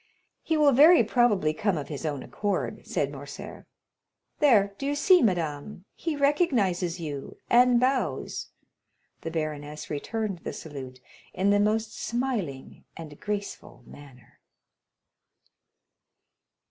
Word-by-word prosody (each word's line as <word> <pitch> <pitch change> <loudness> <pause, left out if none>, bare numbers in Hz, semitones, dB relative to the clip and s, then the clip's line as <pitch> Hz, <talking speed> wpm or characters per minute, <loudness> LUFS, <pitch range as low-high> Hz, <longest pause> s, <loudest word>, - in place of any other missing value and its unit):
"He 320 - 0
will 295 -2 +5
very 300 +3 +7
probably 210 -9 +2
come 200 +1 0
of 145 - -5
his 150 +1 -5
own 145 -3 -3
accord," 180 - -3
said 140 -1 -1
Morcerf. 140 0 -9 0.7
"There; 210 -9 +4
do 275 - -3
you 290 - 0
see, 360 +4 +5
madame, 175 -1 -1
he 325 -3 -3
recognizes 235 - +1
you, 145 -4 -6
and 245 0 +6
bows." 260 +1 -1 0.7
The 165 - -4
baroness 150 -2 -5
returned 200 +5 -3
the - - -6
salute 130 -4 -8 0.4
in 195 +2 +2
the 205 - +4
most 215 +1 0
smiling 225 - -3
and 155 -3 -10
graceful 205 -11 -5
manner. 135 -4 -16
195 Hz, 120 wpm, -27 LUFS, 150-245 Hz, 0.7 s, very